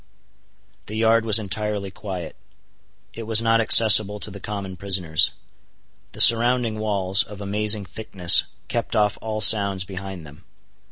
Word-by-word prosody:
The 110 - -8
yard 115 0 0
was 110 -1 +4
entirely 105 -1 -5
quiet. 95 -5 -9 0.8
It 115 -1 -10
was 110 -1 +3
not 115 0 0
accessible 105 -2 +5
to 105 - -5
the 100 - -11
common 100 -1 -8
prisoners. 90 -4 -1 0.8
The - - -4
surrounding 120 -1 +4
walls, 100 -2 0
of 105 -1 -9
amazing 105 +1 -2
thickness, 95 -3 0 0.2
kept - - -5
off 105 -1 -1
all 110 -1 -6
sounds 100 -3 +3
behind 95 -3 -10
them. 75 +4 -16
105 Hz, 135 wpm, -20 LUFS, 95-110 Hz, 0.8 s, accessible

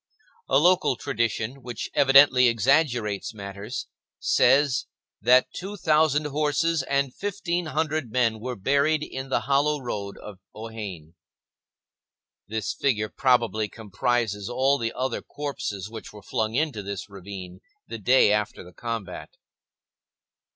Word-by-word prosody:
A 135 - +5
local 175 -2 +4
tradition, 115 +3 -2
which 120 -2 -6
evidently 135 -2 +6
exaggerates 115 -3 +1
matters, 100 +3 -6 0.3
says 135 +1 +3 0.3
that 125 +4 +4
two 200 +3 -6
thousand 155 -3 +2
horses 150 +2 +1
and 140 -1 0
fifteen 180 -4 -2
hundred 155 -4 -1
men 115 -2 +1
were 125 +3 -4
buried 140 +8 +2
in 135 -2 -6
the - - +1
hollow 145 +2 +2
road 100 -6 -5
of 105 -3 -11 0.2
Ohain. 105 -8 -7 1.3
This 110 -1 -3
figure 110 -6 0
probably 115 -5 +1
comprises 110 -1 -2
all 135 +3 +2
the 115 -1 -1
other 130 -1 -2
corpses 120 -9 -5
which 110 0 -9
were 105 -1 -13
flung 110 +1 -2
into 145 -6 0
this 100 -1 -6
ravine 95 -2 -9 0.3
the 115 - -6
day 125 0 +5
after 105 -2 -2
the 90 0 -14
combat. 110 -2 -6
125 Hz, 125 wpm, -25 LUFS, 105-140 Hz, 1.3 s, evidently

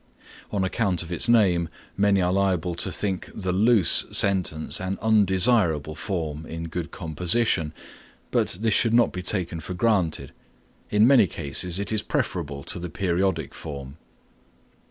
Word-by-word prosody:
On 100 -2 -1
account 95 -2 -1
of 85 - -11
its 90 - +2
name 90 -8 +3 0.3
many 100 -1 +2
are 90 +1 +1
liable 95 -3 0
to 85 - -2
think 95 -3 -2
the 95 -3 -2
loose 105 -1 +4
sentence 90 -6 +2
an 95 +1 -3
undesirable 95 - +3
form 80 -4 -4
in 80 0 -6
good 85 +1 -5
composition, 85 +1 0 0.6
but - - +1
this 110 -2 +1
should 115 +1 +3
not 120 - +3
be 90 - -4
taken 90 -3 -3
for 90 +3 -6
granted. 100 -6 0 0.6
In 105 +1 +4
many 125 -6 +5
cases 85 +4 -1
it 100 +1 -4
is 110 -1 0
preferable 70 -7 -3
to - - -4
the 90 0 -6
periodic 95 +2 -1
form. 70 -2 -8
90 Hz, 150 wpm, -24 LUFS, 85-100 Hz, 0.6 s, many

